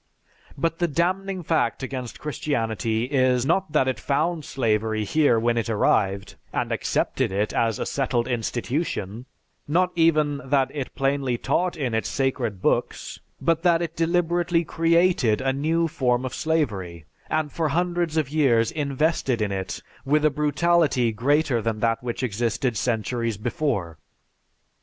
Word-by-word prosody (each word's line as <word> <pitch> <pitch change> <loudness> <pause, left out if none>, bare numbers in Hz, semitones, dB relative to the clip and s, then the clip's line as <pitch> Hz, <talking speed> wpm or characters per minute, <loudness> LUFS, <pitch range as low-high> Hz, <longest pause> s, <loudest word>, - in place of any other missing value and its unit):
"But 165 +3 -1
the 175 - +2
damning 185 +4 -1
fact 135 -7 0
against 130 -2 -5
Christianity 115 -7 -1
is, 130 -1 +2
not 190 +3 +1
that 130 - +3
it 130 -4 -1
found 155 +6 0
slavery 110 -6 0
here 140 -1 +3
when 115 +1 +1
it 115 - -3
arrived, 100 -2 +1
and - - -2
accepted - - 0
it 100 +2 -1
as 115 -2 +1
a - - -3
settled 125 -3 -1
institution, 120 - -3 0.4
not 180 +5 +2
even 155 -4 +2
that 135 0 +1
it 140 -3 -4
is - - -26
plainly 135 -2 0
taught 175 +9 0
in 130 -6 -2
its 110 - -1
'sacred' 130 -8 -1
books, - - -1 0.2
but, 165 -1 +1
that 170 -1 +3
it 165 -1 -5
deliberately 170 0 +1
created 165 -8 +2
a 135 0 0
new 160 +4 +1
form 130 -6 0
of 130 - -4
slavery, 100 - -2 0.2
and 155 -2 -1
for 160 -2 -1
hundreds 175 0 0
of 155 -4 +1
years 130 -6 +2
invested 145 -3 0
it 100 -3 -3 0.2
with 150 +3 +2
a 155 - +4
brutality 150 -4 +2
greater 135 +2 +1
than 110 0 -2
that 115 0 +1
which 125 +1 -4
existed 120 +2 -1
centuries 115 0 -1
before. 105 - -2
135 Hz, 145 wpm, -24 LUFS, 115-160 Hz, 0.4 s, a